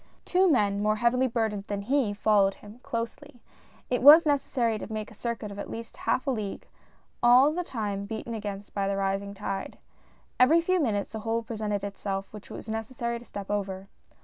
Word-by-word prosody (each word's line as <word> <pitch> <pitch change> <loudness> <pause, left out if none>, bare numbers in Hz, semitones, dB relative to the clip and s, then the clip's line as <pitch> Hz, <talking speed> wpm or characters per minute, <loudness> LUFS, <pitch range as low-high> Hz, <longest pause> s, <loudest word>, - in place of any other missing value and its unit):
Two 370 +1 +3
men, 205 -8 +2
more 215 +1 +2
heavily 240 +3 +2
burdened 220 -4 -1
than 200 -1 -3
he, 260 -1 +1
followed 205 -1 +3
him, 210 +3 -14
closely. 245 +4 -5 0.5
It 245 - 0
was 300 +5 +10
necessary 250 -6 +1
to - - -7
make 215 0 -4
a - - -12
circuit 225 -1 -4
of 200 - -8
at - - -6
least 230 0 -7
a - - -18
half 260 - 0
league, 215 -8 -3 0.6
all 250 +4 +6
the 355 +2 -2
time 205 - -3
beaten 220 +2 -5
against 205 -2 -6
by 200 -1 -1
the 195 0 -1
rising 195 +1 -1
tide. 195 0 -4 0.6
Every 300 +7 +6
few 370 +2 +1
minutes 210 -9 -1
a 220 - -4
hole 225 +1 -1
presented 210 -3 -3
itself 195 -1 -4
which 210 -1 -11
it - - -8
was - - -9
necessary 235 +2 -3
to 240 - -15
step 200 -2 -7
over. 195 -1 -3
220 Hz, 195 wpm, -28 LUFS, 200-245 Hz, 0.6 s, was